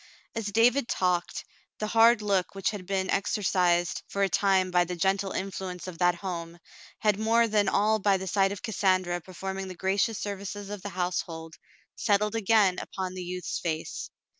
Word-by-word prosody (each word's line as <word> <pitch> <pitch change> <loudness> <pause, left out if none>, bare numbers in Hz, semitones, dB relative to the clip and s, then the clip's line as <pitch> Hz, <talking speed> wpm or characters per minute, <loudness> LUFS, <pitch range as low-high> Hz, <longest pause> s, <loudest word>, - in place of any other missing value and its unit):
As 225 -2 -3
David 235 +5 +3
talked, 180 -4 -1 0.3
the 215 - -2
hard 225 +1 +5
look 195 -2 0
which 195 -1 0
had 195 -4 -7
been 190 -1 -1
exor 200 +1 0
cised 175 -2 +2
for 200 - -1
a 195 - +2
time 190 -2 +2
by 180 0 +4
the 180 +1 -4
gentle 190 +2 0
influence 185 -2 -4
of 185 -3 -8
that 175 -1 +3
home, 170 -2 -5 0.5
and 210 -2 +3
more 230 +1 +3
than 205 -2 +2
all 215 +2 +2
by 195 -1 +3
the 190 - -6
sight 195 +1 +2
of 200 - -7
Cassandra 185 -5 +1
performing 190 +2 -5
the 185 - -7
gracious 195 +4 0
services 200 0 -5
of 205 -2 -6
the 205 - -5
household, 175 -3 -3 0.4
settled 210 0 +1
again 215 -4 +3
upon 185 -1 -5
the 185 - -6
youth's 180 0 -4
face. 160 -2 -4
195 Hz, 180 wpm, -28 LUFS, 180-205 Hz, 0.5 s, hard